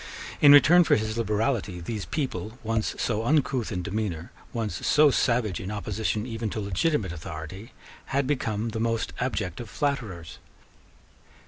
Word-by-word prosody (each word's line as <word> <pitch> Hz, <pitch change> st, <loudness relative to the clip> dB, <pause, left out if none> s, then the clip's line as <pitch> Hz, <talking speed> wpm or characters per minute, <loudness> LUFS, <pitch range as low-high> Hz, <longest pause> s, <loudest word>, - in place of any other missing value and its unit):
In 145 Hz, -, +9 dB
return 165 Hz, +5 st, +8 dB
for -, -, +4 dB
his 110 Hz, 0 st, -2 dB
liberality, 110 Hz, -3 st, -1 dB
these 100 Hz, +3 st, -4 dB
people, 125 Hz, -6 st, -3 dB
once 110 Hz, -1 st, -1 dB
so 110 Hz, -2 st, -1 dB
uncouth 130 Hz, -3 st, +1 dB
in 90 Hz, -3 st, -3 dB
demeanour, 100 Hz, -4 st, -3 dB, 0.2 s
once 115 Hz, -3 st, -3 dB
so 150 Hz, -1 st, +6 dB
savage 115 Hz, -7 st, +1 dB
in 95 Hz, -, -5 dB
opposition 105 Hz, +1 st, -2 dB
even 115 Hz, -2 st, -3 dB
to 110 Hz, -, -4 dB
legitimate 100 Hz, -, 0 dB
authority, 85 Hz, +6 st, -8 dB, 0.3 s
had 140 Hz, 0 st, 0 dB
become 115 Hz, -5 st, -1 dB
the 110 Hz, -, -4 dB
most 115 Hz, 0 st, -1 dB
abject 105 Hz, -9 st, -2 dB
of 120 Hz, -3 st, -7 dB
flatterers. 105 Hz, -, -3 dB
110 Hz, 145 wpm, -26 LUFS, 100-125 Hz, 0.3 s, In